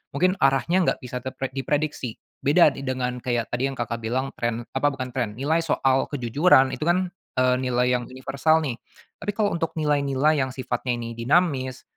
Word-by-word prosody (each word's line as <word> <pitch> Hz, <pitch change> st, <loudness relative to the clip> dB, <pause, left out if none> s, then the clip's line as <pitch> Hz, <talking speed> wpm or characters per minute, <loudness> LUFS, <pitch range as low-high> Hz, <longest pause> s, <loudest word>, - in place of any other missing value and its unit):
mungkin 185 Hz, +5 st, +3 dB
arahnya 135 Hz, +7 st, +3 dB, 0.2 s
gak -, -, -24 dB
bisa 125 Hz, 0 st, -5 dB
terpre 130 Hz, +1 st, -5 dB
diprediksi, 135 Hz, -2 st, -2 dB, 0.2 s
beda 150 Hz, +2 st, +5 dB
dengan 130 Hz, -2 st, -3 dB
kayak 120 Hz, -2 st, -2 dB
tadi 125 Hz, +3 st, 0 dB
yang 135 Hz, -, -5 dB
Kakak 115 Hz, -1 st, -3 dB
bilang 125 Hz, +4 st, -2 dB
trend 120 Hz, 0 st, -1 dB
apa 135 Hz, +2 st, +1 dB
bukan 130 Hz, -3 st, -3 dB
trend, 120 Hz, -5 st, -2 dB
nilai 150 Hz, +7 st, +1 dB
soal 135 Hz, -5 st, +1 dB
kejujuran 135 Hz, +2 st, +3 dB
itu 130 Hz, +3 st, -4 dB
kan, 180 Hz, +1 st, +2 dB, 0.3 s
eee, 130 Hz, 0 st, +3 dB
nilai 125 Hz, -1 st, +1 dB
yang 120 Hz, -, -7 dB
universal 135 Hz, +5 st, +1 dB
nih, 130 Hz, -6 st, -3 dB, 0.4 s
tapi 205 Hz, -, -2 dB
kalau 210 Hz, -1 st, +1 dB
untuk 165 Hz, -1 st, -2 dB
nilai-nilai 145 Hz, -1 st, +2 dB
yang 130 Hz, -1 st, -2 dB
sifatnya 130 Hz, -1 st, -2 dB
ini 115 Hz, -1 st, -5 dB
dinamis, 130 Hz, -1 st, +1 dB
130 Hz, 175 wpm, -24 LUFS, 125-150 Hz, 0.4 s, beda